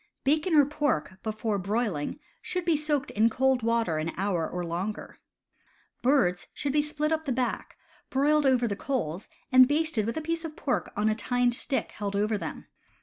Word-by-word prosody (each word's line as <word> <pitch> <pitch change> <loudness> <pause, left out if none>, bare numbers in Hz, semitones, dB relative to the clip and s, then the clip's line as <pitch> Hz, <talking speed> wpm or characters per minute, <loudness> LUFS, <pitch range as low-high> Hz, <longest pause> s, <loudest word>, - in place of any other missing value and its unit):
Bacon 310 +5 +2
or 290 -2 +7
pork, 290 - -1
before 215 -1 -2
broiling, 200 -6 -1 0.2
should 360 -1 -3
be 335 -2 +3
soaked 295 -1 -1
in 220 +2 +3
cold 260 +2 +2
water 225 -8 +1
an 160 +1 -3
hour 185 -4 0
or 180 0 -4
longer. 180 +6 -4 0.8
Birds 205 -10 +2
should 280 -2 -2
be 300 - +4
split 300 +1 -1
up 315 0 0
the 275 - -1
back, 250 0 -2 0.3
broiled 290 +2 +3
over 250 -2 +3
the 200 - -2
coals, 195 - -3 0.2
and 255 0 +8
basted 290 -7 +1
with 230 - -2
a - - +1
piece 330 +1 -2
of 315 -2 -6
pork 265 -4 -2
on 210 +1 +2
tined 245 +2 +1
stick 265 +2 -1
held 205 -1 -4
over 210 +2 +1
them. 205 - -5
245 Hz, 180 wpm, -28 LUFS, 205-295 Hz, 0.8 s, and